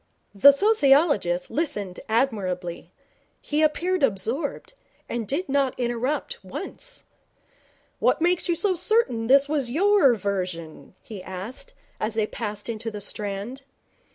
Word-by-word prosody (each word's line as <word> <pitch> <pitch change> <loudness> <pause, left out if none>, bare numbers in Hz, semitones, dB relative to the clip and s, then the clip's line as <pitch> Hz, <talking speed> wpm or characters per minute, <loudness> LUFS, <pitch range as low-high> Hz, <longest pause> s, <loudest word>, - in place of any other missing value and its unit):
The 205 +8 +8
sociologist 280 - +3
listened 240 - -2
admirably. 195 -8 -1 0.5
He 300 +1 -1
appeared 340 +4 +1
absorbed, 250 - -1 0.3
and 230 -3 -3
did 320 - -2
not 275 -2 0
interrupt 255 - -2
once. - - -7 1.0
'What - - +2
makes 350 +2 +1
you 345 - +3
so 390 +3 +1
certain 360 - +1
that 260 - +5
this 280 0 +4
was 290 -5 -1
your 345 - +4
version?' 185 -5 -4
he 210 -5 -8
asked, 195 - -7 0.2
as 215 +1 -2
they 220 -1 +2
passed 210 -2 -5
into 225 -1 -4
the 210 -2 -7
Strand. 205 +5 -4
245 Hz, 125 wpm, -25 LUFS, 205-310 Hz, 1.0 s, The